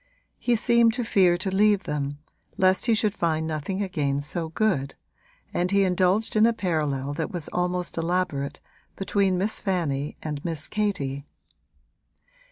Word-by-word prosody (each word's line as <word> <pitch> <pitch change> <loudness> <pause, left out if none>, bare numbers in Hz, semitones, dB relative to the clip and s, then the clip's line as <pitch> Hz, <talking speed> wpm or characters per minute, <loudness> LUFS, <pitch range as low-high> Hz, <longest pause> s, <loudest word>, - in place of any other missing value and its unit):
He 245 - +2
seemed 235 0 +4
to 245 - -1
fear 185 -5 +3
to 190 +2 -2
leave 205 -1 +4
them, 145 -1 -3 0.4
lest 185 +4 +3
he 230 - +4
should 215 -2 +1
find 160 -4 0
nothing 160 +6 -2
again 145 -7 -1
so 160 +3 -3
good, 160 -7 0 0.6
and 180 +1 0
he 200 0 +3
indulged 185 +4 +1
in 215 +1 +6
a 235 - +2
parallel 150 -8 -1
that - - -3
was 175 -4 -5
almost 180 -1 -2
elaborate 165 -5 -1 0.4
between 195 -1 +1
Miss 205 +4 +2
Fanny 150 -8 -2
and 150 -2 -4
Miss 165 -3 -2
Katie. 145 -10 -2
180 Hz, 150 wpm, -25 LUFS, 150-200 Hz, 0.6 s, in